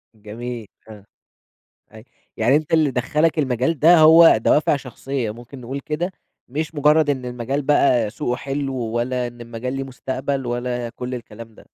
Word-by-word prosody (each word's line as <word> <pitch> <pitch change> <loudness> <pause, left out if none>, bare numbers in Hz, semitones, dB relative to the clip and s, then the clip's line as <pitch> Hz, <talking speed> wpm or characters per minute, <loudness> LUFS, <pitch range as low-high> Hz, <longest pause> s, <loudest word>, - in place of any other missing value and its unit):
جميل 110 +1 -7 0.2
آه، 105 -2 -12 0.9
أي 110 0 -12 0.3
يعني 120 +5 +3
أنتَ 155 +2 -1
اللي 155 -4 +3
دَخَّلك 150 +6 0
المجال 130 +3 0
ده 170 +3 +6
هو 160 -2 +8
دوافع 150 +7 +2
شخصيَّة، 130 -3 -4
ممكن 120 +3 -12
نقول 135 +4 -5
كده، 165 +6 -3 0.4
مش 155 +5 -4
مُجرَّد 150 +1 +3
إن 130 -3 -1
المجال 125 +3 -3
بقى 130 -6 +2
سُوقُه 125 +1 -3
حلو، 135 -1 -3
ولا 120 +1 -2
إن 120 0 -11
المجال 120 +2 -5
ليه 135 0 -3
مُستقبل، 135 +1 -4
ولا 120 0 -3
كُلّ 125 +2 -6
الكلام 115 -1 -11
ده؟ - - -17
130 Hz, 160 wpm, -21 LUFS, 120-145 Hz, 0.9 s, هو